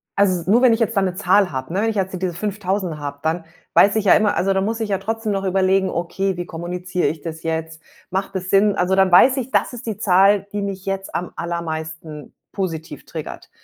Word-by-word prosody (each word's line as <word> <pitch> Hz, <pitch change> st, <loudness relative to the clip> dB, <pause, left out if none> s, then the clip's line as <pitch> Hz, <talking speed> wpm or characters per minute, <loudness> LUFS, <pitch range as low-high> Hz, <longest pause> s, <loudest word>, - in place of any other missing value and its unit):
also, 185 Hz, -3 st, +1 dB
nur 230 Hz, +4 st, +5 dB
wenn 255 Hz, -3 st, +6 dB
ich 225 Hz, -, 0 dB
jetzt 230 Hz, 0 st, 0 dB
da -, -, +4 dB
'ne 185 Hz, -2 st, -1 dB
Zahl 200 Hz, -1 st, +3 dB
habe, 130 Hz, +4 st, -5 dB
ne, 195 Hz, -, 0 dB
wenn 225 Hz, -, +1 dB
ich 220 Hz, -, -3 dB
jetzt 190 Hz, -2 st, -2 dB
diese 185 Hz, -2 st, -1 dB
5.000 195 Hz, -2 st, -2 dB
habe, 145 Hz, -1 st, -6 dB
dann 165 Hz, +1 st, -1 dB, 0.3 s
weiß 200 Hz, +1 st, +5 dB
ich 215 Hz, -2 st, 0 dB
ja 195 Hz, -, +7 dB
immer 215 Hz, -1 st, +3 dB
also, 195 Hz, +2 st, +1 dB
da 190 Hz, -, +1 dB
muss 225 Hz, +4 st, -2 dB
ich 220 Hz, -2 st, -2 dB
ja 195 Hz, -, +1 dB
trotzdem 220 Hz, +2 st, -3 dB
noch 195 Hz, -1 st, -2 dB
überlegen, 190 Hz, 0 st, +2 dB
okay, 185 Hz, +2 st, -2 dB
wie 175 Hz, -, -4 dB
kommuniziere 180 Hz, +2 st, -3 dB
ich 155 Hz, -1 st, -3 dB
das 160 Hz, 0 st, -7 dB
jetzt? 160 Hz, 0 st, -3 dB, 0.3 s
Macht 195 Hz, +1 st, -3 dB
das 185 Hz, 0 st, -4 dB
Sinn? 200 Hz, +1 st, +4 dB
Also, 185 Hz, 0 st, +1 dB
dann 190 Hz, -1 st, +3 dB
weiß 255 Hz, +10 st, +6 dB
ich, 260 Hz, 0 st, -3 dB
das -, -, +1 dB
ist 245 Hz, 0 st, -8 dB
die 215 Hz, -3 st, -3 dB
Zahl, 195 Hz, +1 st, +4 dB
die 205 Hz, -, -2 dB
mich 195 Hz, -1 st, -5 dB
jetzt 195 Hz, 0 st, -4 dB
am 180 Hz, -, -3 dB
allermeisten 160 Hz, -3 st, -5 dB, 0.2 s
positiv 165 Hz, -5 st, -5 dB
triggert. -, -, -8 dB
190 Hz, 235 wpm, -21 LUFS, 170-200 Hz, 0.3 s, ja